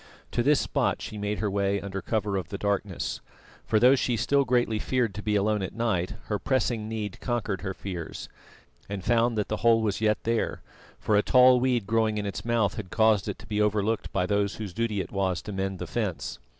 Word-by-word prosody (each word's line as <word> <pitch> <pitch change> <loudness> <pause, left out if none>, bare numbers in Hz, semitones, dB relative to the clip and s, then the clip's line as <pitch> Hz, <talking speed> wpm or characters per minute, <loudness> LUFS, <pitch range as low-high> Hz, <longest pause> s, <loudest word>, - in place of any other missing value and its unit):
To 120 - +1
this 145 +4 +4
spot - - 0
she 105 - -6
made 105 0 -2
her 105 -2 -1
way 100 0 +1
under 100 -1 -5
cover 105 -2 -1
of 90 -3 -3
the 100 - -4
darkness 100 -2 -2 0.5
for 110 - +3
though 125 +4 +7
she 125 -3 +1
still 140 +5 +2
greatly 120 -4 +1
feared 120 -3 0
to 105 - -6
be 105 0 0
alone 105 +1 +1
at 95 - -5
night, 110 -4 -1
her 105 -2 -2
pressing 120 -5 0
need 105 -3 -4
conquered 110 -6 -2
her 95 0 -4
fears 90 -5 -6 0.6
and 100 -2 -4
found 120 -1 +2
that 105 - 0
the 110 - -2
hole 115 0 +4
was 105 -1 -1
yet 105 -1 +3
there, 115 0 -1 0.3
for 105 - 0
a 105 - +5
tall 125 +1 +6
weed 125 -4 +1
growing 110 0 +1
in 105 - -2
its 100 - -4
mouth 115 -4 +1
had 100 -4 -5
caused 110 -2 +3
it - - -4
to - - -13
be 105 0 -1
overlooked 105 +1 0
by 90 -2 0
those 100 +1 0
whose 105 -5 -6
duty 110 -2 -1
it - - -8
was 95 -3 0
to 105 - -6
mend 95 -1 -2
the - - -5
fence. - - -3
105 Hz, 220 wpm, -27 LUFS, 100-115 Hz, 0.6 s, though